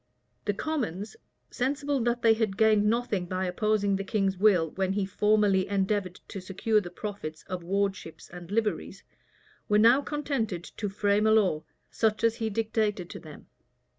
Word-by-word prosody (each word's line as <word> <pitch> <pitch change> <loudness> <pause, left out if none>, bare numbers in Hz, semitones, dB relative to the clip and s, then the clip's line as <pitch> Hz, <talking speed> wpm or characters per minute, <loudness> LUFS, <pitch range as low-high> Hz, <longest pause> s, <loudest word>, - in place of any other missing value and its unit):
4 - - -48 0.4
The 205 - +1
commons, 220 - -3 0.4
sensible 280 +2 -1
that 240 0 -1
they 225 -1 +6
had 220 -4 -1
gained 215 -1 +4
nothing 220 -5 0
by 185 +1 -2
opposing 205 +2 +1
the 195 - -3
king's 195 -2 0
will 180 -5 +3
when 190 0 -1
he 200 -1 0
formerly 205 -1 +2
endeavored 195 -2 -1
to 195 - -6
secure 205 +4 +1
the 175 - -7
profits 185 -7 -6
of 185 -1 -5
wardships 190 -2 -3
and 175 -1 -11
liveries, 215 +1 -2 0.7
were 210 - +4
now 235 +6 +6
contented 275 - -2
to 205 +3 -5
frame 205 +2 +1
a - - +4
law,[*] 190 -8 +2 0.3
such 220 -1 0
as 230 0 +2
he 225 -1 -1
dictated 215 -4 -1
to - - -7
them. 155 -2 -12
205 Hz, 165 wpm, -28 LUFS, 190-220 Hz, 0.7 s, they